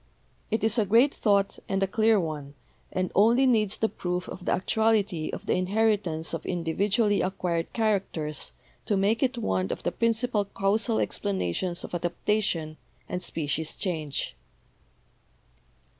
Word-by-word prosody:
It 220 Hz, 0 st, -1 dB
is 220 Hz, +2 st, +3 dB
a 215 Hz, -, +3 dB
great 235 Hz, +8 st, +5 dB
thought 200 Hz, -2 st, +1 dB
and 195 Hz, 0 st, +1 dB
a -, -, +2 dB
clear 220 Hz, +2 st, +3 dB
one, 150 Hz, -4 st, -4 dB, 0.4 s
and 185 Hz, -1 st, -1 dB
only 235 Hz, +6 st, +5 dB
needs 215 Hz, -5 st, +2 dB
the 220 Hz, -, +2 dB
proof 180 Hz, -3 st, -3 dB
of 180 Hz, -1 st, -8 dB
the -, -, +1 dB
actuality 205 Hz, -4 st, +1 dB
of -, -, -6 dB
the -, -, +1 dB
inheritance 185 Hz, -4 st, 0 dB
of -, -, -3 dB
individually 200 Hz, +5 st, +1 dB
acquired 175 Hz, -3 st, -1 dB
characters 190 Hz, -, -1 dB, 0.4 s
to 205 Hz, -, +2 dB
make 205 Hz, +4 st, +2 dB
it 260 Hz, -1 st, +1 dB
one 95 Hz, -, 0 dB
of -, -, -4 dB
the -, -, 0 dB
principal 230 Hz, -1 st, +1 dB
causal 205 Hz, +3 st, 0 dB
explanations 180 Hz, -, -1 dB
of -, -, -8 dB
adaptation 175 Hz, -2 st, -1 dB, 0.3 s
and 180 Hz, -, -3 dB
species 155 Hz, -1 st, -2 dB
change. 155 Hz, -, -3 dB
195 Hz, 145 wpm, -27 LUFS, 170-220 Hz, 0.4 s, great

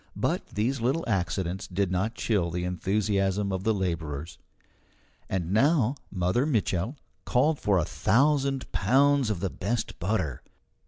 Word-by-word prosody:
But -, -, -1 dB
these 120 Hz, +5 st, -1 dB
little 135 Hz, +8 st, +1 dB
accidents 95 Hz, -1 st, -1 dB
did 95 Hz, 0 st, -1 dB
not 100 Hz, +5 st, -1 dB
chill 100 Hz, -7 st, 0 dB
the 90 Hz, +1 st, -3 dB
enthusiasm 100 Hz, +2 st, 0 dB
of 95 Hz, 0 st, -3 dB
the 110 Hz, -, +2 dB
labourers. 85 Hz, -6 st, -3 dB, 0.9 s
And 90 Hz, -2 st, -2 dB
now 135 Hz, +1 st, +3 dB, 0.2 s
Mother 95 Hz, +9 st, +1 dB
Mitchel 110 Hz, -, 0 dB, 0.3 s
called 145 Hz, +4 st, +2 dB
for 100 Hz, -2 st, +2 dB
a 85 Hz, -, +1 dB
thousand 140 Hz, 0 st, +1 dB
pounds 140 Hz, -1 st, +3 dB
of 105 Hz, -5 st, -2 dB
the 95 Hz, -, -1 dB
best 105 Hz, +4 st, -3 dB
butter. 90 Hz, -, -1 dB
100 Hz, 140 wpm, -27 LUFS, 90-125 Hz, 0.9 s, now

